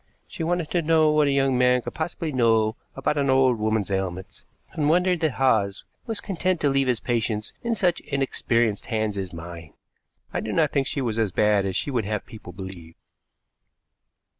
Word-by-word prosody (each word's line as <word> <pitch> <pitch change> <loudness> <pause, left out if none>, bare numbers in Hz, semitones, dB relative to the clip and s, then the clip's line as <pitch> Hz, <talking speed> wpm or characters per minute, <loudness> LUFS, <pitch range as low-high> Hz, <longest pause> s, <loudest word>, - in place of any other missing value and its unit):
She - - -8
wanted 170 -1 -1
to 175 - +2
know 160 -1 +4
what 150 -1 +3
a - - +2
young 135 -2 +2
man 125 -1 +3
could - - -6
possibly 160 0 -3
know 115 -4 +2 0.2
about 150 - 0
an 140 -1 +1
old 130 -3 +4
woman's 110 -2 0
ailments, 95 +1 -4 0.3
and 150 -2 0
wondered 180 +1 +3
that 155 -4 +1
Hawes 110 -7 +1 0.2
was 225 -2 -2
content 185 -2 -1
to 145 - +3
leave 135 -1 +2
his 125 -3 +1
patients 110 -3 -2
in 235 -1 -1
such 180 -5 +1
inexperienced 120 -6 -1
hands 110 -3 -1
as 95 -2 -4
mine. 85 -2 -9 0.6
I - - 0
do 110 - -4
not 155 -3 +2
think 135 -2 +1
she 140 - -2
was 115 -3 -1
as 110 -4 +1
bad 105 0 +2
as 95 - -3
she 145 - -1
would 120 -5 0
have 105 0 -3
people 110 -6 -11
believe." 90 -3 -9
125 Hz, 190 wpm, -24 LUFS, 105-150 Hz, 0.6 s, know